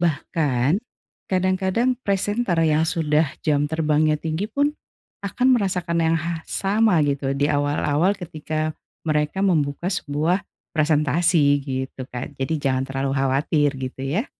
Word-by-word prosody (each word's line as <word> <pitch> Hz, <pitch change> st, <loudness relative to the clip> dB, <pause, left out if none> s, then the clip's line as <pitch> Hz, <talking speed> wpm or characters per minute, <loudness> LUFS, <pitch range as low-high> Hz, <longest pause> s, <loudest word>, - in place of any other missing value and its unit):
bahkan 150 Hz, -2 st, +1 dB, 0.5 s
kadang-kadang 190 Hz, +6 st, +1 dB
presenter 200 Hz, 0 st, 0 dB
yang 155 Hz, 0 st, +3 dB
sudah 155 Hz, -2 st, +1 dB, 0.2 s
jam 145 Hz, -1 st, +2 dB
terbangnya 155 Hz, -1 st, +2 dB
tinggi 160 Hz, +5 st, -2 dB
pun 285 Hz, +1 st, +1 dB, 0.5 s
akan 245 Hz, +6 st, 0 dB
merasakan 180 Hz, -4 st, -1 dB
yang 165 Hz, +1 st, +3 dB
ha 170 Hz, 0 st, -3 dB
sama 205 Hz, 0 st, +2 dB
gitu 140 Hz, -1 st, -1 dB
diawal-awal 145 Hz, +4 st, +1 dB
ketika 155 Hz, -2 st, -3 dB, 0.4 s
mereka 150 Hz, +4 st, 0 dB
membuka 160 Hz, -2 st, +1 dB
sebuah 155 Hz, +3 st, 0 dB, 0.4 s
presentasi, 155 Hz, +2 st, +3 dB, 0.2 s
gitu, 130 Hz, -1 st, -4 dB
Kak. 125 Hz, +3 st, -6 dB
Jadi 145 Hz, +4 st, -1 dB
jangan 130 Hz, -2 st, +1 dB
terlalu 135 Hz, 0 st, -2 dB
khawatir 140 Hz, +2 st, +2 dB
gitu 130 Hz, 0 st, -5 dB
ya. 210 Hz, -, 0 dB
155 Hz, 120 wpm, -23 LUFS, 145-180 Hz, 0.5 s, yang